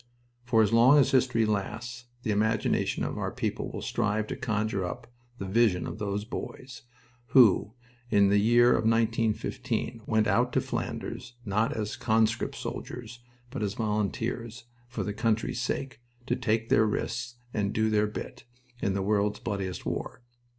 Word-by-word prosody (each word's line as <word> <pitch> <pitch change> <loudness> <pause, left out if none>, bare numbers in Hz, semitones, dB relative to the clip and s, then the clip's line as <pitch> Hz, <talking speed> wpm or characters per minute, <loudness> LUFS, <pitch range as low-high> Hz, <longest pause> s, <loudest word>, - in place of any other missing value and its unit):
For 115 -2 +4
as 105 - 0
long 125 +5 +7
as 140 - +4
history 125 -4 +3
lasts 115 +4 -3 0.2
the 110 - 0
imagination 110 +1 +1
of - - -3
our - - -1
people - - -3
will - - -6
strive 105 0 0
to - - -2
conjure 110 -4 -1
up 90 - -5 0.3
the 100 - -5
vision 95 -2 +2
of - - -6
those 105 0 -2
boys 125 +2 -7 0.5
who, 110 -4 +5 0.3
in 100 -3 +4
the 100 +1 +4
year 120 +3 +5
of - - +4
1915, 115 +1 0
went 110 -1 +3
out 120 +4 +2
to - - +3
Flanders, 120 - -4
not 105 +5 +1
as 105 -2 -3
conscript 110 0 +1
soldiers, 120 -1 -6 0.3
but 135 - -4
as 100 -1 -1
volunteers, 110 +2 -2 0.2
for 120 - -4
the 105 - -2
old 100 - -9
country's 115 -1 0
sake, 130 -4 -3 0.2
to - - 0
take 115 0 0
their 110 - +4
risks 115 +3 -3 0.2
and 100 -2 0
"do 110 0 +1
their 105 0 +3
bit" 105 - -7 0.4
in 100 -1 0
the 100 - 0
world's 105 +1 +1
bloodiest 95 -4 -4
war. 125 - -4
110 Hz, 165 wpm, -28 LUFS, 105-120 Hz, 0.5 s, long